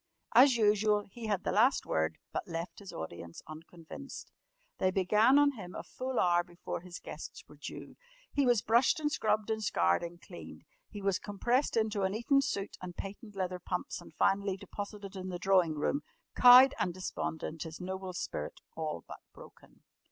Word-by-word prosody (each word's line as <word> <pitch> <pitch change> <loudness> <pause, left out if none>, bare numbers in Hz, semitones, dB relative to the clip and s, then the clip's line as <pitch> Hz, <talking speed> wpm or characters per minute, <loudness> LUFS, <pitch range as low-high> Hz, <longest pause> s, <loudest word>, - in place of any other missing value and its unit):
As 255 +1 +7
usual 210 -1 +3
he 230 +1 -7
had 205 -3 0
the - - 0
last 235 +7 +3
word, 80 0 0 0.2
but - - -3
left 170 +1 -5
his 200 -2 -9
audience 85 +1 -8
unconvinced. 165 - -10 0.5
They 185 - +3
began 210 +8 +4
on 290 0 +5
him 190 -8 -9
a - - -5
full 255 -1 -3
hour 175 -1 +3
before 175 -1 -6
his 180 0 -8
guests - - -9
were - - -16
due. - - -9 0.4
He 280 -2 +2
was 240 -3 +3
brushed 235 +7 +4
and 300 -1 0
scrubbed 215 -5 0
and 220 0 -2
scoured 85 - +2
and 170 0 -7
cleaned. - - -11 0.3
He 205 -2 -8
was 195 -2 +1
compressed 235 +7 0
into 215 -2 +1
an 190 +1 0
Eton 275 +5 +3
suit 200 -7 -3
and 180 -1 -8
patent 205 +2 -8
leather 185 -1 -2
pumps 180 0 -4
and - - -13
finally 195 -1 +1
deposited 200 0 -7
in 185 0 -5
the 180 - -3
drawing 175 -3 +3
room, 255 - 0 0.3
cowed 255 +2 +9
and 175 - -1
despondent, 160 -3 -4
his 160 -1 -6
noble 190 0 -5
spirit - - -5 0.2
all 155 - -4
but - - -9 0.2
broken. - - -16
195 Hz, 180 wpm, -32 LUFS, 175-225 Hz, 0.5 s, cowed